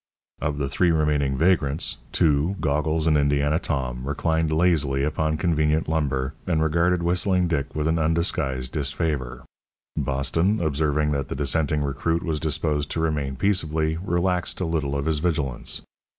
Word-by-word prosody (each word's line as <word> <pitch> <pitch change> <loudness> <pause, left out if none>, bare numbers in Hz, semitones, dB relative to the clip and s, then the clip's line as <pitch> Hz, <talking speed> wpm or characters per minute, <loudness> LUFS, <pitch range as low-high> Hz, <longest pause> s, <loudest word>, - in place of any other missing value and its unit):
Of 75 0 -1
the 70 -1 -1
three 85 +6 +2
remaining 75 -4 +1
vagrants, 80 -3 +1
two, 80 +4 +2
Goggles 75 +2 0
and 80 -2 +4
Indiana 70 +1 +2
Tom, 65 -7 -2
reclined 80 +2 0
lazily 80 -5 +2
upon 80 +1 0
convenient 75 -2 +1
lumber 70 -4 -1
and 85 -3 +1
regarded 85 +3 +2
Whistling 90 +1 +2
Dick 70 -5 -2
with 75 0 0
undisguised 80 -5 0
disfavour. 70 -4 -2 0.5
Boston, 70 - 0
observing 75 -1 +1
that 70 -2 -1
the - - -4
dissenting 75 +1 0
recruit 75 +4 -1
was 80 -4 -1
disposed 75 -1 -1
to - - -3
remain 75 -4 -1
peaceably, 80 -3 0
relaxed 90 0 -1
a 90 - -1
little 75 -4 -1
of 70 - -2
his 80 -2 +1
vigilance. 75 -7 -2
75 Hz, 145 wpm, -24 LUFS, 70-80 Hz, 0.5 s, and